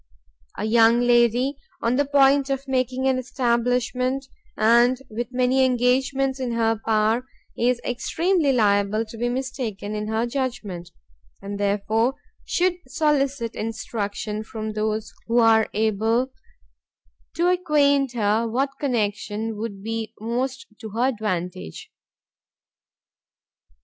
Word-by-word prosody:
A - - -3
young 230 +1 +5
lady 245 +3 +3 0.3
on 230 +2 +2
the 285 +2 +2
point 275 0 +4
of 275 0 -2
making 260 0 0
an 260 -1 +2
establishment, 250 +1 0 0.3
and 240 +3 +4
with 235 +2 -3
many 255 +1 +2
engagements 260 +2 +1
in 250 -2 -2
her 225 -1 +1
power, 225 +3 +1 0.3
is 245 +1 +1
extremely 320 +5 +1
liable 210 -2 +2
to 220 - -11
be 240 +2 -1
mistaken 245 -5 -4
in 210 0 -3
her 220 +2 0
judgment, 235 -9 -4 0.5
and 200 0 -6
therefore 210 +5 +1 0.3
should 360 0 +1
solicit 280 -6 0
instruction 215 -1 -4
from 220 0 -5
those 215 0 -2
who 235 +1 +1
are 225 -2 +5
able 220 +4 +1 1.0
to 345 +2 +2
acquaint 285 -7 +2
her 220 0 +1
what 270 +4 -2
connection 220 -3 -2
would 205 -2 -6
be 225 0 -4
most 250 +4 -3
to 220 - -7
her 245 +3 +2
advantage. 180 - -4
235 Hz, 120 wpm, -23 LUFS, 220-265 Hz, 1.0 s, young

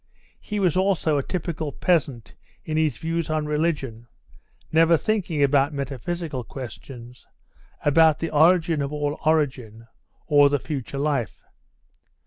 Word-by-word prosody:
He 210 -1 -4
was 180 -5 +2
also 185 -6 +1
a - - -2
typical 165 -3 -4
peasant 140 - -1 0.3
in 155 - -3
his 155 -2 +1
views 165 0 -3
on 155 -1 -1
religion, 150 -7 -2 0.6
never 165 +1 +5
thinking 175 -7 -1
about 140 +1 +2
metaphysical 140 +1 -4
questions, 125 0 -10 0.6
about 155 +1 +5
the 165 - -4
origin 165 0 +3
of 140 0 -3
all 145 0 -2
origin, 130 -8 0 0.4
or 145 -2 +5
the 145 - +1
future 140 -1 -5
life. 140 -5 -2
150 Hz, 125 wpm, -24 LUFS, 140-165 Hz, 0.6 s, never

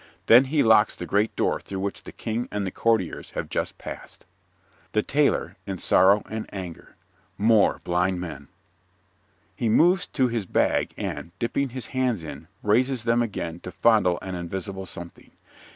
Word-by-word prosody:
Then 120 +4 +7
he 145 +2 +2
locks 110 -1 +5
the 90 - -6
great 105 +5 +1
door - - +1
through 95 -1 -6
which 100 0 -4
the - - -8
King 115 +2 -3
and 105 -1 -2
the 95 - -3
Courtiers 110 -6 0
have - - -3
just - - -2
passed._) - - -10 0.7
THE 105 - +2
TAILOR 145 0 +1
(in 95 -1 -3
sorrow 95 +4 +4
and 110 0 -6
anger) 90 -4 -8 0.4
More 110 0 +3
blind 90 +1 0
men. 75 -6 -7 1.1
(_He 115 - +1
moves 175 - +4
to 130 -3 +1
his 115 -5 -3
bag - - +1
and, 85 +2 -5
dipping 135 +5 -1
his 125 -2 -6
hands 125 -8 0
in, 80 0 -8 0.2
raises 125 +4 +2
them 115 +1 +2
again 85 -7 -3
to 90 - -8
fondle 90 -3 +3
an 95 - -5
invisible 95 +2 -5
something. 85 0 -10
105 Hz, 165 wpm, -25 LUFS, 90-115 Hz, 1.1 s, Then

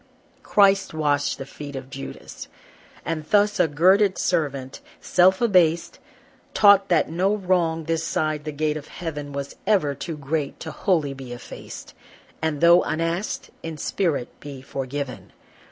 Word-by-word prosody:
Christ 195 -4 +3
washed 145 -2 0
the 135 - -6
feet 145 0 -9
of 135 0 -8
Judas! 135 0 -8 0.6
And 165 -2 -2
thus 205 0 +3
a 175 - +4
girded 185 +6 +3
servant, 140 -6 -1 0.2
self 185 +3 +3
abased, 175 -7 +2 0.6
Taught 200 -1 +6
that 175 - +2
no 190 +5 +1
wrong 175 -5 0
this 165 +1 -1
side 155 -2 -1
the 155 - -4
gate 150 +1 -1
of 150 - -9
heaven 150 -4 -6
Was 140 0 -6
ever 185 -10 +2
too 155 +3 -6
great 145 0 -3
to 160 - -5
wholly 155 -5 0
be 130 -2 -8
effaced, 120 - -10 0.5
And 155 -2 -1
though 170 +1 +7
unasked, 165 +5 -2
in 165 -1 -6
spirit 150 -5 -1
be 140 -2 -9
forgiven. 135 0 -5
160 Hz, 145 wpm, -23 LUFS, 145-180 Hz, 0.6 s, though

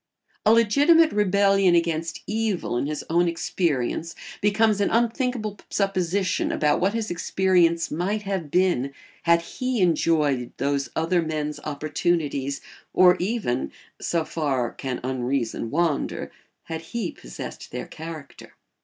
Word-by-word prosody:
A - - +7
legitimate 290 +9 +5
rebellion 195 -2 +3
against 165 -1 -1
evil 215 - -1
in 125 - 0
his 150 0 -4
own 175 +2 +2
experience 165 -2 -1 0.3
becomes 210 0 +3
an 200 - +2
unthinkable 235 -2 0
supposition 195 -1 0
about 150 +1 +1
what 195 +4 +1
his 220 -3 -2
experience 175 -2 +2
might 195 +7 -1
have 190 -6 -3
been 140 -6 +1 0.3
had 170 0 +4
he 255 +6 -3
enjoyed 155 -7 +2
those 140 -2 -1
other 170 +2 +2
men's 150 -2 -3
opportunities 145 -2 -1 0.3
or 180 -1 +7
even 185 - -1 0.3
(so 165 -2 0
far 135 -7 -1
can 130 -2 -4
unreason 125 -2 -2
wander) 160 0 -1 0.3
had 160 -1 -5
he 190 +3 -4
possessed - - -9
their - - -4
character. 160 -3 -10
170 Hz, 125 wpm, -24 LUFS, 150-200 Hz, 0.3 s, A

